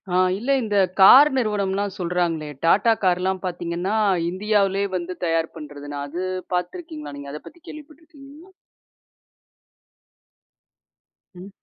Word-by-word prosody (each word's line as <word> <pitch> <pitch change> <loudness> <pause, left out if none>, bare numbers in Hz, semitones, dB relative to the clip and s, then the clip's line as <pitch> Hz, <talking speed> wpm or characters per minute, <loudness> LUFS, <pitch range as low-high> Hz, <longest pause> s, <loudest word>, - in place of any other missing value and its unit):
ஆ. - - +3 0.2
இல்லை. 275 +5 0
இந்த 210 -2 -1 0.2
கார் 270 +10 +9
நிறுவனம்லாம் 205 -3 -1
சொல்றாங்களே, 170 -3 -2 0.2
Tata 210 +7 +4
கார்லாம் 185 0 +1
பாத்தீங்கன்னா 175 +2 -3 0.3
இந்தியாவுலயே 200 +1 0
வந்து 180 +1 -6
தயார் 165 -1 -1
பண்றதுன்னு 145 -2 -8
அது 170 +6 -6 0.3
பாத்துருக்கீங்களா 300 - -5
நீங்க, 140 0 -9
அதை 150 - -7
பத்தி 345 - -15
கேள்விப்பட்டுருக்கீங்களா? 305 +2 -14 2.8
ம். 185 +3 -11
190 Hz, 105 wpm, -22 LUFS, 170-230 Hz, 2.8 s, கார்